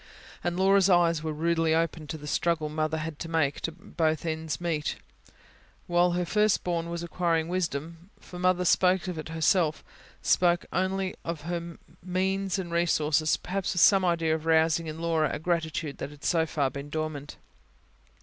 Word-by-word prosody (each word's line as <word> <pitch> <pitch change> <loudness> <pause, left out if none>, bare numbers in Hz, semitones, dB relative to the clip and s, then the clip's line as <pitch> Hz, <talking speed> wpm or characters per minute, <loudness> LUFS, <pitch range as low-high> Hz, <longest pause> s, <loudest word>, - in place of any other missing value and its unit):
And 175 0 -1
Laura's 195 0 +4
eyes 170 -3 +4
were 160 0 -3
rudely 165 +1 +1
opened 160 -2 -1
to 160 - -4
the 150 - -10
struggle 160 0 0
Mother 155 +1 -1
had 155 - -3
had 160 -3 -7
to 165 - -5
make 160 -4 +1 0.2
both 160 -2 -1
ends 160 -3 -3
meet, 165 -4 -1 0.9
while 175 0 +2
her 180 0 0
first 210 +3 +2
born 170 -1 -2
was 170 0 -4
acquiring 170 -2 0
wisdom; 170 0 -3
for 180 - -10
Mother 180 0 +2
spoke 185 0 +3
of 175 -3 -4
it 155 - -7
herself, 160 0 +1 0.4
spoke 175 -1 +3
openly 190 0 0
of 165 -2 -4
her 170 +1 -5 0.2
means 190 +2 -1
and 180 -3 -5
resources, 155 -3 +2
perhaps 190 +1 -3
with 175 - +2
some 195 -2 +6
idea 165 -3 +1
of 160 0 -3
rousing 160 0 +3
in 155 0 -5
Laura 165 -2 +1
a - - -2
gratitude 160 -3 -2
that - - -4
had 145 -1 -15
so 165 -2 +2
far 140 -4 0
been 140 +1 -7
dormant. 155 -2 -4
165 Hz, 175 wpm, -28 LUFS, 155-180 Hz, 0.9 s, some